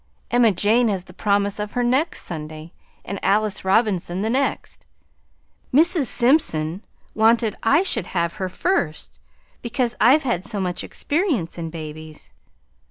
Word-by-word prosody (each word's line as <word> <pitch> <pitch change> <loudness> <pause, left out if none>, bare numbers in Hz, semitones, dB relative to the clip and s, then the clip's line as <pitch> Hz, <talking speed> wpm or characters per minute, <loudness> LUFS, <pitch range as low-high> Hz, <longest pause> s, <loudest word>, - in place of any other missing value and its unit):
Emma 240 -2 +4
Jane 220 +6 +2
has 195 -4 -1
the 180 - -15
promise 200 +1 0
of 210 0 -4
her 245 - 0
next 265 +7 0
Sunday 155 0 -8 0.3
and 200 - -5
Alice 210 0 +1
Robinson 190 -2 +1
the 220 - 0
next. 270 +3 -2 0.8
Mrs. 320 +2 +4
Simpson 205 - +1 0.3
wanted 225 0 +3
I 285 +10 +3
should 390 - -1
have 170 +1 -2
her 190 -2 -3
first 180 - -2 0.4
because 240 0 -1
I've 265 +7 +5
had 235 -9 -1
so 205 -1 -3
much 180 -2 -2
experience 285 - -2
in 165 -1 -4
babies. 155 -1 -9
210 Hz, 140 wpm, -22 LUFS, 175-245 Hz, 0.8 s, I've